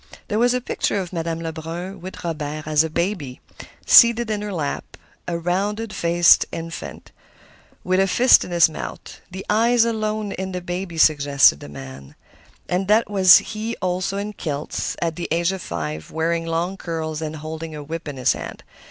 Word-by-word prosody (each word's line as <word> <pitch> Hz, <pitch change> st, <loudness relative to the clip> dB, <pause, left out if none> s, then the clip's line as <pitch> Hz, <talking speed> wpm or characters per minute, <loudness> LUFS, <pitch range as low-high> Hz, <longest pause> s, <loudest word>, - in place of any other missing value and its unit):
There 210 Hz, -, 0 dB
was 245 Hz, +1 st, +3 dB
a 250 Hz, -, -1 dB
picture 230 Hz, -, -1 dB
of 185 Hz, -2 st, -6 dB
Madame 165 Hz, -1 st, -3 dB
Lebrun 165 Hz, +4 st, -6 dB
with 185 Hz, +1 st, -9 dB
Robert 155 Hz, -2 st, -4 dB
as 155 Hz, 0 st, +3 dB
a 160 Hz, -, -3 dB
baby, 165 Hz, -6 st, -3 dB, 0.5 s
seated 235 Hz, -1 st, +6 dB
in 210 Hz, -1 st, -2 dB
her 210 Hz, 0 st, -4 dB
lap, 150 Hz, -6 st, -4 dB, 0.3 s
a 170 Hz, -, -1 dB
round 205 Hz, +6 st, -2 dB
faced 170 Hz, 0 st, +4 dB
infant 165 Hz, 0 st, -7 dB, 0.7 s
with 185 Hz, +1 st, +1 dB
a 195 Hz, -, +3 dB
fist 245 Hz, +6 st, +5 dB
in -, -, -8 dB
his 170 Hz, -2 st, +5 dB
mouth. 155 Hz, -, -8 dB
The 190 Hz, +1 st, -8 dB
eyes 230 Hz, +2 st, +3 dB
alone 215 Hz, -2 st, -2 dB
in 190 Hz, 0 st, -5 dB
the 180 Hz, -, -4 dB
baby 175 Hz, -1 st, -5 dB
suggested 140 Hz, -, +4 dB
the 70 Hz, -, -10 dB
man. 70 Hz, -1 st, -10 dB, 0.5 s
And 185 Hz, +2 st, -1 dB
that 215 Hz, +1 st, +3 dB
was 190 Hz, -2 st, +8 dB
he 220 Hz, +1 st, -4 dB
also 185 Hz, +2 st, -2 dB
in 205 Hz, +1 st, -4 dB
kilts, 150 Hz, -6 st, -4 dB
at 165 Hz, -2 st, -2 dB
the 175 Hz, -, -4 dB
age 170 Hz, +2 st, +1 dB
of 190 Hz, -1 st, -5 dB
five, 80 Hz, -2 st, -5 dB
wearing 165 Hz, +1 st, -1 dB
long 170 Hz, +4 st, -2 dB
curls 160 Hz, -3 st, -4 dB
and 155 Hz, 0 st, -4 dB
holding 160 Hz, +1 st, -7 dB
a 150 Hz, -, -7 dB
whip 165 Hz, +2 st, -6 dB
in 145 Hz, -2 st, -6 dB
his 125 Hz, -, +2 dB
hand. -, -, -8 dB
170 Hz, 180 wpm, -22 LUFS, 155-195 Hz, 0.7 s, was